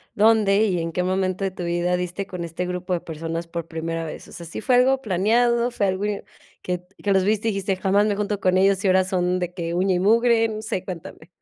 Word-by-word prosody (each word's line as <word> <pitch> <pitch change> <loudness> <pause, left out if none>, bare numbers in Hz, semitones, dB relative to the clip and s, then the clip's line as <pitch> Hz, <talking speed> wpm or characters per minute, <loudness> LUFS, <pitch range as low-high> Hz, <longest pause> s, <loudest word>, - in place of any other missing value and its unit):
dónde 210 -1 +4
y 185 -4 0
en 165 0 -3
qué 180 - -1
momento 185 +1 -1
de - - +1
tu 180 - -7
vida 175 +1 0
diste 180 +2 -4
con 180 -2 -5
este 170 +2 -4
grupo 180 0 -3
de 175 - +1
personas 165 +1 -5
por 165 -1 -5
primera 165 0 -4
vez. 155 - -8
O - - -15
sea, 170 - -8
¿sí 165 - -6
fue 250 +2 +2
algo 265 +2 +4
planeado, 235 +5 +2
fue 205 -4 0
algo 190 +2 -1
i 205 -1 -2 0.4
que 180 -1 -3 0.2
que 205 - +1
los 190 -1 +4
viste, 215 +2 +1
dijiste: 195 -1 -1
“Jamás 200 +2 +2
me 210 -1 +1
junto 205 0 -2
con 185 -1 +2
ellos”, 195 0 +3
y - - +2
ahora 185 0 +4
son 180 -1 0
de 180 0 -3
que 170 -2 -3
uña 185 +2 +2
y - - +1
mugre? 225 +3 +4
No 215 0 -5
sé, 205 -4 -3
cuéntame. 175 -2 -8
185 Hz, 245 wpm, -23 LUFS, 175-205 Hz, 0.4 s, dónde